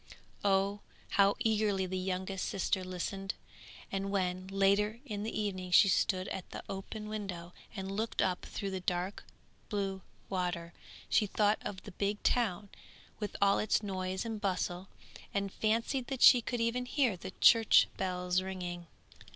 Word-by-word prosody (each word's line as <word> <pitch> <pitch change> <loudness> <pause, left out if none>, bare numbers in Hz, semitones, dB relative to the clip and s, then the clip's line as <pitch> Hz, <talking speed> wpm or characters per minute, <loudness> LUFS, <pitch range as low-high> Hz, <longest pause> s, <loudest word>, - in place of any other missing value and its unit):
Oh, 200 0 +2 0.3
how 200 0 +4
eagerly 215 -4 +1
the 185 0 -4
youngest 185 +1 -2
sister 190 0 0
listened! 195 +2 -4 0.6
and 195 0 -2
when, 185 -1 -1
later 200 +3 +2
in 210 -5 -4
the 220 +1 -3
evening 185 -3 -3
she 180 - +7
stood 185 0 +1
at 190 - -5
the - - -7
open 210 +2 -6
window 185 -5 -5 0.2
and 195 -1 -4
looked 220 +3 -3
up 180 -1 +1
through 200 -2 -4
the 190 - -3
dark 180 +2 -2 0.5
blue 195 -2 -2 0.3
water, 175 -3 -2 0.3
she 210 - +3
thought 210 +1 +2
of 190 -2 -6
the 205 - -9
big 205 +3 -2
town 210 -5 +1 0.5
with 210 -2 -4
all 200 0 +4
its 215 0 +1
noise 190 0 -3
and 220 -2 -4
bustle, 185 -1 -1 0.5
and 200 -1 -1
fancied 230 +4 0
that 270 -2 -1
she 245 - +9
could 240 0 -2
even 245 +2 0
hear 250 -6 +2
the 185 +1 -7
church 225 -2 +7
bells 180 -1 0
ringing. 180 -2 -5
195 Hz, 155 wpm, -32 LUFS, 185-210 Hz, 0.6 s, she